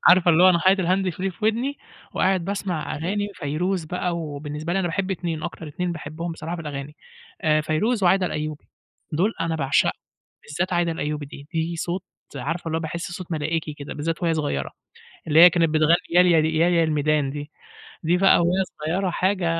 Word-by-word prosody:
عارفة 180 -1 +6
اللي 170 +2 +5
هو 185 - +9
أنا 175 - +4
حاطط 190 +2 +4
الهاند 185 +1 +1
فري 190 +3 -3
في 210 +4 -8
ودني 240 +6 0 0.4
وقاعد 185 -2 +2
باسمع 190 -4 -3
أغاني 205 +6 -2
فيروز 170 +5 -2
بقى، 180 +1 -2
وبالنسبة 150 0 -5
لي 195 - +1
أنا 185 - 0
باحب 195 +3 -2
اتنين، 170 -3 -3
أكتر 160 - -6
اتنين 175 +4 -3
باحبهم 165 +2 -5
بصراحة 165 +1 -5
في 165 - -7
الأغاني 145 0 -6 0.4
آآ، 155 -1 +3
فيروز 200 +9 0
وعايدة 185 +1 +4
الأيوبي، 150 -2 -4 0.5
دول 190 +9 +2
أنا 165 -1 0
باعشقهم 140 -2 +2 0.5
بالذات 175 +5 -2
عايدة 175 -1 +1
الأيوبي 150 -2 -3
دي 140 0 -11
دي 165 +1 -1
صوت 175 +3 -3 0.3
عارفة 160 +7 -3
والله 160 0 -1
باحس 170 +2 -5
صوت 175 -1 -7
ملائكي 155 0 -2
كده، 145 -1 -8
بالذات 165 +4 -3
وهي 165 - +2
صغيرة 145 - -2 0.6
اللي 155 0 +4
هي 180 - +11
كانت 165 -1 +2
بتغني 155 +2 +4
يا 175 +1 +6
ياه 165 -1 +3
يا 170 -1 +3
الميدان 150 -2 +1
دي، 145 +1 -7 0.5
دي 170 +2 +3
بقى 195 -1 +5
وهي 180 +3 +2 0.2
صغيرة 185 +4 0
حاجة 185 +1 0
165 Hz, 185 wpm, -23 LUFS, 155-180 Hz, 0.6 s, هي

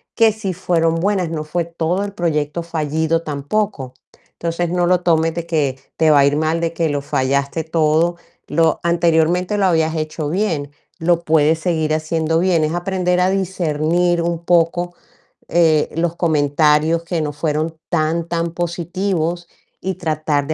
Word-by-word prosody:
que 225 -1 +5
sí 205 -3 -4
fueron 165 -2 +1
buenas, 185 0 0
no 160 -2 -3
fue 165 +3 -2
todo 170 +3 -1
el 200 - -5
proyecto 160 -2 -1
fallido, 160 0 -1
tampoco. 145 -1 -3 0.4
Entonces, 170 +1 -2
no 175 0 +1
lo 180 -1 +3
tomes 165 -2 +2
de 170 -1 -4
que, 150 -6 0 0.2
te 160 -1 +3
va 145 - +6
a 140 - +5
ir 145 +1 +2
mal, 160 +2 0
de 170 0 -1
que 165 -1 0
lo 145 -1 -1
fallaste 140 +3 -1
todo. 160 +1 +2 0.3
Lo 165 +1 +2
anteriormente, 170 +3 +2
lo 200 - +2
habías 160 -3 +2
hecho 155 -1 -3
bien, 165 -6 -1 0.3
lo 170 +1 +2
puedes 160 0 +3
seguir 160 -3 0
haciendo 160 +1 0
bien. 175 -3 +2
Es 155 +2 0
aprender 180 0 0
a 180 +1 +3
discernir 175 -2 0
un 170 0 -2
poco, 175 +1 +1 0.5
eh, 160 -3 +3
los 170 0 -1
comentarios 155 +1 +2
que 170 0 -2
no 150 -1 -2
fueron 155 +2 -2
tan 165 0 0
tan 170 0 -2
positivos, 175 0 -2 0.4
y 190 +1 -2
tratar 155 -4 -1
de 155 - -1
165 Hz, 165 wpm, -19 LUFS, 155-175 Hz, 0.5 s, va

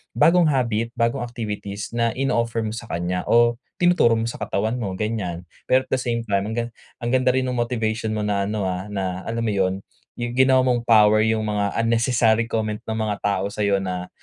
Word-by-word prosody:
bagong 170 0 +5
habit 115 -5 0
bagong 115 +3 +1
activities 105 -4 -5
na 115 0 +1
ino-offer 115 -4 0
mo 110 - -3
sa 115 +1 -7
kanya 90 +1 -2
o 120 +1 +4 0.2
tinuturo 175 -10 +4
mo 115 - -1
sa 115 +1 -4
katawan 105 0 -1
mo, 100 -5 -3
ganyan. 95 -4 -3 0.2
Pero 130 +1 +4
at - - -26
the 130 - +2
same 120 -2 -2
time 100 -2 -1
ang 110 - -4
ga 120 - 0 0.4
ang 120 - -1
ganda 130 0 +2
rin 130 - +1
nung 125 -1 -2
motivation 110 -2 -1
mo 105 - -2
na 100 -1 0
ano, 105 -1 -2
ah, 95 +1 -3
na 95 -3 -3
alam 115 0 -2
mo 110 - 0
'yun 95 -1 0 0.3
yung 120 0 -3
ginawa 130 +1 +4
mong 120 -2 0
power 110 -1 +6
yung 110 0 +1
mga 105 -1 -1
unnecessary 115 -1 +2
comment 110 -2 -2
ng 110 - -2
mga 110 -2 -2
tao 100 -1 -1
sa'yo 100 -2 0
na, 90 -1 -4
110 Hz, 205 wpm, -22 LUFS, 100-120 Hz, 0.4 s, power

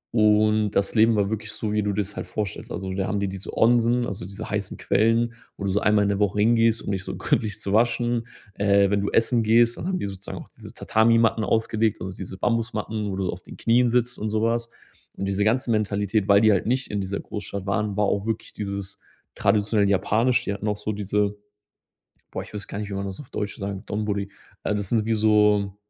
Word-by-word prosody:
Und 105 -1 +4
das 100 -1 0
Leben 115 0 +4
war 100 0 +1
wirklich 110 0 -3
so, 110 0 -3
wie 105 - +2
du 105 - 0
dir 105 +1 0
's 100 +1 -10
halt - - -5
vorstellst. 105 -4 -4
Also 95 0 -4
da 95 0 -1
haben 100 - -1
die 100 - -1
diese 95 0 -7
Onsen, 120 +1 +3
also 95 -4 -5
diese 100 0 -7
heißen 100 -2 -3
Quellen, 115 +3 +2 0.2
wo - - -6
du 100 - 0
so 105 - +2
einmal 105 -1 +3
in 100 - +1
der 100 0 0
Woche 105 0 +1
hingehst, 115 +1 +3
um - - -3
dich 95 -2 -2
so - - -5
gründlich 105 -3 -1
zu 100 - -3
waschen. 120 +1 +1 0.3
Äh, 100 -1 +3
wenn 100 -1 +2
du 100 - -1
essen 115 +1 +2
gehst, 115 +2 +4
dann 175 - -5
haben 190 -1 0
die - - -3
sozusagen 95 0 -7
auch - - -10
diese - - -13
Tatami-Matten 115 0 +3
ausgelegt, 110 -1 +1
also 95 +1 -5
diese 95 0 -8
Bambusmatten, 110 -2 -1
wo 95 - -3
du 95 -1 -2
auf 90 - -8
den - - -12
Knien 120 +1 +3
sitzt 125 0 0
und 110 0 -2
sowas. 115 +2 0 0.5
Und 95 - -3
diese 100 +1 0
ganze 120 +2 +1
Mentalität, 105 -1 0
weil 100 0 +6
die 110 -1 +5
halt 100 +1 +1
nicht 130 +2 -1
in 105 -1 -1
dieser 95 +1 -3
Großstadt 100 -2 -6
waren, 100 +1 -1
war 105 - +3
auch 100 +1 -1
wirklich 110 -1 -3
dieses 100 -1 -5 0.4
traditionell 105 -1 +2
japanisch. 115 +5 +2
Die 100 - -1
hatten 100 +1 -5
auch 105 - 0
so 105 +1 -3
diese 105 0 -1 1.0
boah, - - -4
ich - - -15
wüsste 100 -1 -5
gar 100 - -4
nicht, 105 - -5
wie 100 - -4
man 100 0 -3
das 95 -1 -6
auf 140 - -11
Deutsch 105 -1 -4
sagt, 100 -1 -5
Donburi. 100 -1 -2 0.3
Äh, - - 0
das 100 -2 -2
sind 110 -3 +1
wie 115 - +1
so 105 -2 +3
105 Hz, 230 wpm, -24 LUFS, 100-115 Hz, 1.0 s, weil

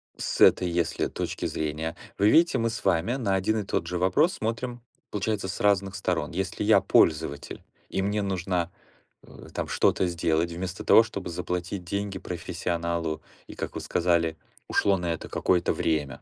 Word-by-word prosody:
С - - -3
этой 90 -1 +6
если 85 -2 0
точки - - -4
зрения, 80 +1 -3 0.2
вы 105 +2 +4
видите, 165 -2 +5
мы 115 0 +1
с 115 - -5
вами 95 +6 +2
на 100 -7 0
один 110 +3 +1
и - - -2
тот - - -1
же 90 - -3
вопрос 145 - +3
смотрим, 120 +2 -3 0.3
получается, 105 -1 -1
с 95 - -5
разных 100 -1 +2
сторон. 90 -5 -1
Если 95 +2 -3
я - - +5
пользователь, 75 -2 +1 0.3
и 95 - -1
мне 100 +1 0
нужна, 90 -2 -1 0.5
э, - - -13
там - - -3
что-то 95 - +2
сделать, 85 0 0
вместо 90 +1 -5
того 115 - +7
чтобы 100 -5 -6
заплатить 90 +2 -3
деньги 100 +2 -3
профессионалу, 85 -2 -3 0.2
и, - - -10
как - - -5
вы - - -3
сказали, 85 -2 +1 0.3
ушло 100 -1 +2
на 85 -1 -1
это - - -7
какое-то 90 -2 +1
время, 75 -5 -1
90 Hz, 170 wpm, -27 LUFS, 85-100 Hz, 0.5 s, того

